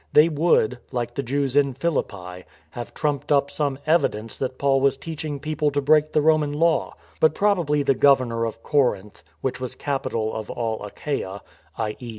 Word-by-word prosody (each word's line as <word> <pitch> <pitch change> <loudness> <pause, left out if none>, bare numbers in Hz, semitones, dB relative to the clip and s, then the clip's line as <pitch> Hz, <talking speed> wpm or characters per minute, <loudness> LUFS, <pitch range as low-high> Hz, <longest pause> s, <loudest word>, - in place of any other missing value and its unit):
They 150 +3 +7
would 145 -6 +2
— - - -37
like 120 -2 -3
the 140 - -2
Jews 135 +1 -1
in 140 -3 +3
Philippi 100 - -3
— - - -29
have 120 -1 -7
trumped 145 -1 -2
up 140 -1 +3
some 140 -3 -1
evidence 115 -9 +1
that 130 -1 -3
Paul 135 -1 +2
was 135 0 +3
teach 160 +2 -6
ing 145 -2 -4
people 155 0 0
to 145 0 -1
break 150 +2 +3
the 150 - +2
Roman 155 -2 +3
law; 165 +2 +1 0.2
but 155 -1 +4
probably 175 -8 +2
the 135 - +3
governor 130 -4 +3
of 115 0 -6
Corinth 105 - 0
— 85 - -37
which 130 -1 -3
was 130 - -4
capital 115 -6 -2
of 110 -1 -5
all 115 -3 -3
Achaia 100 -3 -4 0.3
(i.e. 110 +2 -4
140 Hz, 190 wpm, -23 LUFS, 115-150 Hz, 0.3 s, They